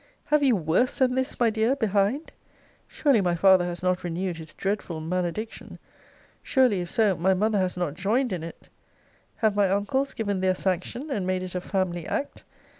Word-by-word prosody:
Have 300 0 +2
you 265 -4 +4
worse 175 +8 +1
than 255 -1 +3
this, 260 0 -2
my 235 -2 +3
dear, 225 +4 +1
behind? 220 - 0 0.6
Surely 275 -8 +2
my 175 -2 +1
father 185 0 +5
has 175 0 -5
not 180 0 0
renewed 175 0 -3
his 160 -1 -9
dreadful 195 -4 -3
malediction! 180 +6 -4 0.6
Surely, 250 -9 +2
if 175 - -6
so, 215 -4 +2
my 190 +3 +2
mother 210 +2 +1
has 185 -1 -1
not 175 -5 -1
joined 215 - 0
in 175 - -3
it! 165 0 -10 0.7
Have 215 -2 +1
my 200 -2 +3
uncles 265 +8 0
given 205 -5 -2
their 185 0 +2
sanction, 190 - -2
and 200 -8 -2
made 185 0 -1
it 185 - -6
a 180 - -2
family 180 -4 -2
act? 285 - -4
195 Hz, 185 wpm, -26 LUFS, 180-230 Hz, 0.7 s, father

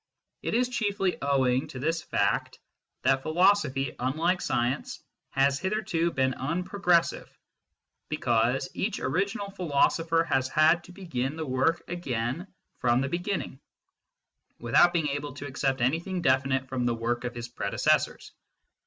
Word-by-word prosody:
It - - -2
is 250 +1 +3
chiefly 205 -6 0
owing 130 -2 +2
to - - -9
this 160 +5 -1
fact - - 0 0.5
that 135 -1 +3
philosophy, 155 -5 +2
unlike 160 +9 0
science, 120 +3 -1 0.3
has 135 +1 +2
hitherto 190 -3 0
been 130 -4 +1
unprogressive, 180 +4 0 0.8
because - - +1
each - - -2
original 195 +7 -1
philosopher 165 -1 +2
has 135 -5 0
had 160 +3 +4
to - - -13
begin 150 -8 -3
the 160 -1 -4
work 130 +5 +1
again 140 - -3 0.3
from 120 +1 +2
the 135 - -1
beginning, 175 -5 -3 1.0
without 120 +9 +4
being 165 -4 0
able 145 0 -4
to 145 - -7
accept 135 -1 -1
anything 170 +8 0
definite 130 -1 +2
from 130 -2 -1
the 120 - +1
work 120 +1 -2
of 120 -1 -4
his 120 0 -5
predecessors. 110 -4 0
145 Hz, 135 wpm, -28 LUFS, 130-175 Hz, 1.0 s, had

